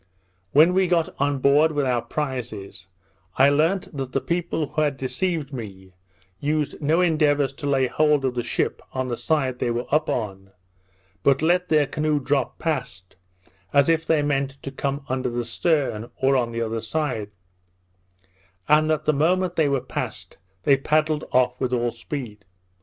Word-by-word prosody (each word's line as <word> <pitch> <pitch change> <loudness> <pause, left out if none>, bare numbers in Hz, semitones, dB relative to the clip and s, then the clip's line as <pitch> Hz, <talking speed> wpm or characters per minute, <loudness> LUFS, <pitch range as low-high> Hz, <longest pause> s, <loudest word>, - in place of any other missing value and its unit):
When 160 +5 +6
we 190 0 +3
got 170 -2 +1
on 140 0 +1
board 145 +4 +4
with 145 -2 0
our 125 -2 +1
prizes, 115 - -5 0.5
I 135 +2 +6
learnt 160 +5 +1
that 135 -2 -5
the - - +2
people 170 0 -2
who 155 - -2
had 145 -3 0
deceived 150 +1 -2
me, 95 -6 -8 0.5
used 150 +1 -1
no 155 +4 +2
endeavours 145 -5 +2
to 145 +1 -6
lay 135 -2 +3
hold 150 +1 +2
of 130 - 0
the 125 - -1
ship 120 - -2
on 130 -1 -2
the 120 - -1
side 130 -3 -1
they - - 0
were 120 +1 -2
up 155 0 +2
on, 95 -4 -4 0.7
but 140 +5 +3
let 180 +2 +2
their 150 -2 +4
canoe 150 +1 0
drop 135 -1 -1
past, 125 - -4 0.6
as 140 +2 +4
if 165 0 +2
they 160 -2 +2
meant 140 -1 -1
to 135 - -5
come 140 +1 -3
under 130 -1 -1
the 120 0 -3
stern, 125 -4 0
or 135 +1 +3
on 120 -3 +1
the 115 0 -2
other 115 0 -3
side; 115 -4 -2 1.4
and 155 +1 +4
that 155 -1 0
the 155 - +3
moment 180 +5 +1
they 155 -3 +2
were 135 -2 +1
past, - - -6 0.2
they 140 -1 +5
paddled 155 +2 +1
off 125 0 +2
with 130 -1 0
all 120 -1 0
speed. 115 -3 -7
140 Hz, 175 wpm, -23 LUFS, 125-155 Hz, 1.4 s, When